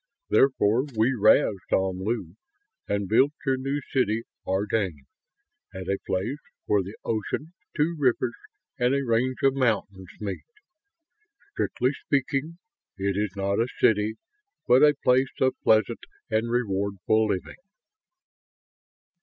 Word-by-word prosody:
Therefore 130 -2 +3
we 115 +5 +3
razed 105 -3 +3
Omlu 95 0 -1 0.5
and 100 -1 -1
built 130 +8 +4
your 135 -1 +2
new 135 +2 -2
city, 115 -4 +1 0.2
Ardane, 95 -6 -1 0.7
at 95 -1 -6
a 100 0 0
place 105 +10 -2 0.3
where 105 -1 +2
the 95 +3 -8
ocean, 130 +9 -3 0.2
two 165 +3 +1
rivers, 125 -3 +1 0.5
and 125 +2 +2
a 140 -1 -1
range 125 +2 +1
of 135 -1 +5
mountains 100 -8 -1
meet. 105 -2 -4 1.1
Strictly 130 - 0 0.2
speaking, 140 +3 0 0.4
it 100 0 -1
is 105 -1 -2
not 100 +1 -1
a 115 - +2
city, 110 0 +3 0.5
but 125 +2 +6
a 150 -1 +6
place 130 +1 +3
of 130 0 +3
pleasant 110 +1 +3 0.3
and 110 +2 +1
rewardful 100 -2 0
living." 95 - -3
110 Hz, 120 wpm, -26 LUFS, 100-130 Hz, 1.1 s, but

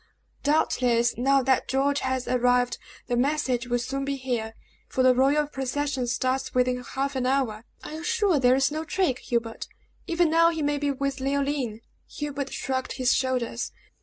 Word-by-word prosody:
Doubtless, 245 -5 +2
now 270 +3 +3
that 260 0 +2
George 280 +2 +1
has 260 -1 -2
arrived, 245 0 +2 0.3
the 245 - -1
message 255 -2 0
will 245 0 +1
soon 270 +3 -3
be 275 0 -2
here, 240 -4 -3 0.3
for 260 - 0
the 255 0 +6
royal 275 +4 +3
procession 270 -1 -2
starts 255 +2 -1
within 250 0 +1
half 275 +3 -3
an 255 -1 0
hour." 250 -5 0 0.2
"Are - - -7
you 315 +1 -6
sure 405 -5 +2
there 250 0 +5
is 270 +1 +2
no 310 +1 -3
trick, 320 -6 0
Hubert? 230 -2 -3 0.4
Even 340 -1 +2
now 335 +1 +5
he 320 -2 -2
may 290 0 0
be 290 0 0
with 275 0 -2
Leoline!" 275 -4 -1 0.3
Hubert 285 -2 -4
shrugged 260 -1 -3
his 255 -1 +2
shoulders. 250 -3 -1
265 Hz, 170 wpm, -26 LUFS, 250-285 Hz, 0.4 s, the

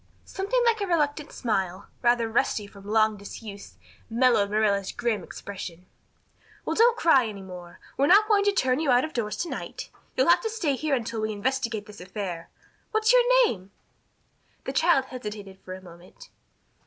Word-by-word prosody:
Something 445 +6 -1
like 455 -2 +2
a 400 - -1
reluctant 300 -3 0
smile, 190 -6 -2
rather 240 -1 +3
rusty 225 -2 0
from 200 0 -14
long 215 0 +2
disuse, 200 - -10 0.3
mellowed 230 -3 +3
Marilla's 205 -2 +1
grim 230 -6 -1
expression. 180 -2 -8 0.8
"Well, - - -1
don't 465 +1 +5
cry 275 - +4
any 200 -2 -7
more. 180 -2 -11 0.2
We're 280 - +3
not 410 +5 +6
going 415 -2 +4
to 405 - +4
turn 260 -8 +1
you 315 -3 0
out 250 +2 +4
of 315 - -9
doors 210 -4 -2
to 345 - -6
night. - - -6 0.3
You'll - - +3
have - - +6
to 445 - -2
stay 370 -11 -1
here 295 +1 0
until 230 -2 -3
we 215 0 -1
investigate 230 -1 -2
this 210 -3 -12
affair. 180 -3 -6 0.4
What's 435 +1 +3
your - - +7 0.2
name?" 190 - -4 0.9
The - - -4
child 325 -5 +3
hesitated 210 -6 -8
for 185 - -7
a 185 - -12
moment. 175 0 -15
230 Hz, 175 wpm, -26 LUFS, 200-305 Hz, 0.9 s, your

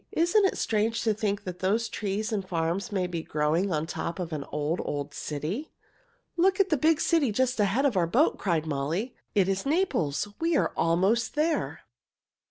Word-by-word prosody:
"Isn't 370 +5 +3
it 385 - +1
strange 225 +1 0
to 220 - +2
think 205 -1 -2
that 180 -1 -6
those 215 +5 +1
trees 210 +2 -3
and 205 -3 -1
farms 170 +4 -1
may 190 -3 0
be 175 -2 -3
growing 160 +5 0
on 155 -1 0
top 170 +1 -4
of 175 -3 -4
an 145 -2 -3
old, 150 +3 -2
old 145 0 -4
city?" 160 - -4 0.7
"Look 375 +3 +3
at 390 -1 +3
the - - +5
big 310 +2 +3
city 315 -8 +2
just 255 +2 0
ahead 210 +7 +2
of 265 -6 +2
our 175 -3 +2
boat!" 260 - +2
cried 165 -5 0
Molly. 160 - -2 0.2
"It 195 -3 +4
is 195 0 0
Naples. 275 - 0
We 330 -1 +2
are - - +1
almost 190 - +1
there!" 310 +2 0
200 Hz, 185 wpm, -27 LUFS, 165-260 Hz, 0.7 s, the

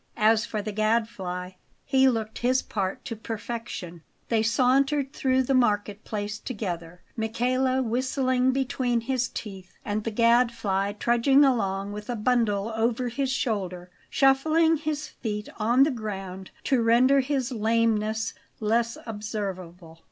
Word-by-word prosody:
As 220 +1 +3
for 215 -2 -3
the 215 - -3
Gadfly, 210 -4 -1 0.3
he 265 -1 +4
looked 220 -3 -3
his 255 +2 +2
part 195 -3 -3
to 230 - -4
perfection. 220 -6 -6 0.3
They 225 -2 +2
sauntered 270 +4 +2
through 260 -1 +2
the 270 - 0
market 210 -4 +1
place 210 0 -4
together, 180 -8 -5
Michele 255 +3 0
whistling 255 +1 +1
between 255 -3 0
his 250 0 -1
teeth, 190 -4 -8
and 210 0 -2
the 225 - -1
Gadfly 230 -4 +2
trudging 240 +6 +4
along 200 -6 0
with 210 +2 -8
a 245 - -1
bundle 225 -2 +1
over 235 +2 0
his 270 +2 -1
shoulder, 185 -9 -2 0.2
shuffling 315 +4 +3
his 300 0 -3
feet 210 -2 -5
on 240 +5 +4
the 295 - +2
ground 195 -5 -6
to 260 -3 +2
render 245 +4 +5
his 265 -1 -1
lameness 220 -1 +1 0.3
less 230 +2 0
observable. 190 -6 -6
230 Hz, 135 wpm, -26 LUFS, 210-255 Hz, 0.3 s, render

